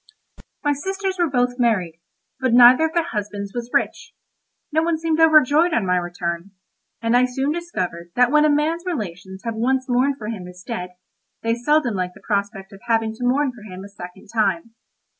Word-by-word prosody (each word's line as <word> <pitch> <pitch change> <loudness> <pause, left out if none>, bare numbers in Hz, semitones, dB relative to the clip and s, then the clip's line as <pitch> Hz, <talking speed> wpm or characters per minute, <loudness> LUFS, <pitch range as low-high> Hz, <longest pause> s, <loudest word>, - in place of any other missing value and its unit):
My 290 -1 +2
sisters 380 +5 -3
were 345 -2 +2
both 245 -1 0
married, 185 -9 0 0.4
but 260 -2 +1
neither 250 +5 +8
of 320 - -10
their 340 - +3
husbands 205 -7 -5
was 240 -1 -5
rich. - - -1 0.6
No 315 +1 +2
one 330 0 0
seemed 325 0 -1
overjoyed 315 +1 +5
on 220 - +1
my 180 0 +2
return; 175 +1 -4 0.5
and 230 +1 +2
I 250 +1 +5
soon 265 +3 -1
discovered 180 - -4
that 250 0 +4
when 300 0 +5
a 305 - +4
man's 310 +3 +1
relations 190 - -5
have 230 -1 -3
once 255 +4 0
mourned 260 +2 +1
for 215 -3 -6
him 195 -6 -6
as 180 0 -12
dead, 180 -6 -6 0.5
they 230 0 +1
seldom 245 +1 +1
like 180 -2 -3
the - - -14
prospect 200 -1 -3
of 195 - -13
having 225 -1 +1
to 225 - -8
mourn 265 +3 +2
for 240 -3 -15
him 190 -3 -9
a 200 - -10
second 190 +1 -11
time. 210 -1 0
235 Hz, 195 wpm, -21 LUFS, 195-290 Hz, 0.6 s, neither